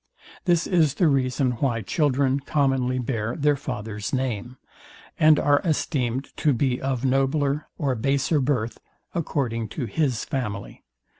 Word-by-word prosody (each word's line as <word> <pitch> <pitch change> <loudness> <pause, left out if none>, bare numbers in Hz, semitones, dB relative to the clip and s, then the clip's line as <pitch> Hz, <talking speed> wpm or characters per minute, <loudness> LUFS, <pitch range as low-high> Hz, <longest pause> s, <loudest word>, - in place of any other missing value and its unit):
This 175 -2 +3
is 160 -7 +2
the 175 - +3
reason 130 -2 +1
why 115 -4 0
children 140 - +1
commonly 135 -3 +1
bear 115 -3 -2
their 150 -2 +2
father's 105 -6 -5
name, 125 -2 -2 0.6
and 155 -1 +6
are 145 0 +3
esteemed 135 -6 -1
to 150 - +2
be 125 0 0
of 135 -1 -1
nobler 135 +2 +1
or 140 -5 0
baser 135 +5 +1
birth, 125 -4 -1 0.3
according 125 -9 -1
to 130 - -4
his 130 +1 -1
family. 105 -7 -4
135 Hz, 135 wpm, -24 LUFS, 120-145 Hz, 0.6 s, and